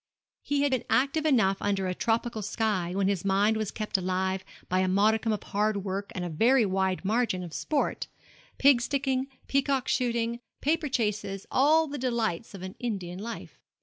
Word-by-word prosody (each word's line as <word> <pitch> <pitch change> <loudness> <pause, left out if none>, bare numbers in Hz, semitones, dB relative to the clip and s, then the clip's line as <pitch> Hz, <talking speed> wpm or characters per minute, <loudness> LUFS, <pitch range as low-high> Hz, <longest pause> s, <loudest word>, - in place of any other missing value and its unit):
He 285 0 0
had 285 - +2
been 260 -3 0
active 280 +4 +2
enough 195 -9 +3
under 195 -2 0
a 185 - -1
tropical 225 +2 -1
sky, 200 -4 -1
when 195 -1 +1
his 195 -4 0
mind 200 +3 +3
was 215 -2 -2
kept 215 -2 -2
alive 185 +1 -1 0.2
by 185 - +1
a 185 - +2
modicum 215 +4 +2
of 210 - -2
hard 205 -1 -1
work 195 +1 -3
and 180 -2 -3
a - - -3
very 230 +9 +4
wide 190 -1 0
margin 215 -3 +1
of 170 -2 -8
sport 300 - -1 0.5
pig 270 -3 +5
sticking, 265 0 0 0.2
peacock 275 -1 +1
shooting, 235 -2 0 0.2
paper 310 +1 0
chases, 210 -5 -2
all 310 +4 +4
the 290 -2 -6
delights 230 -6 -1
of 185 - -9
an 185 0 -6
Indian 190 -7 -4
life. 230 +3 -7
215 Hz, 180 wpm, -28 LUFS, 190-255 Hz, 0.5 s, pig